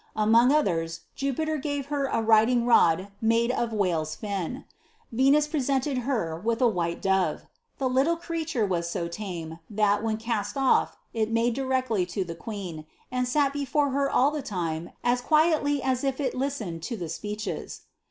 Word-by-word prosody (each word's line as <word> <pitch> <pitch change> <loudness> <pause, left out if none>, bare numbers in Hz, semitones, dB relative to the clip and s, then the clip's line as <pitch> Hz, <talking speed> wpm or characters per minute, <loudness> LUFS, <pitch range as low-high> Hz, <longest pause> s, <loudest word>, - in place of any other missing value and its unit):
Among 225 +4 +5
others, 165 - +1
Jupiter 310 +3 -1
gave 285 -1 -3
her 280 -1 +1
a 230 -4 0
riding 225 +2 +4
nxJ 190 -5 +4
made 230 +2 +3
of 235 -2 -1
whale's 170 -7 0
fin. 205 +5 -4 0.5
Venus 275 +5 +4
presented 275 -2 0
her 220 - -2
witli 230 +1 0
a 250 - +6
white 170 -5 -2
dove. 190 -1 +1 0.3
The 270 - 0
iiitle 275 +7 +2
creature 325 -8 -2
was 170 -3 -1
so 170 0 -2
tame, 170 -3 -6
that, 205 -1 +2
when 220 -1 0
cast 215 -3 -2
ofif, 270 -2 +3 0.2
it 220 -1 0
made 230 +1 +2
directly 255 -7 0
to 190 +2 -2
the 170 -2 -6
queen, 175 -5 -7 0.2
and 250 0 0
sat 280 +2 +2
before 285 0 0
her 275 +1 +1
all 275 +3 +3
tlie 300 -2 -4
time 170 -5 -3
as 245 0 +2
quietly 305 -1 +2
as 260 -1 0
if 270 0 -1
it 265 -4 -1
listened 250 -11 -3
to 230 +8 -4
the 175 -4 -4
speeches. 210 +6 -5
230 Hz, 170 wpm, -27 LUFS, 195-275 Hz, 0.5 s, a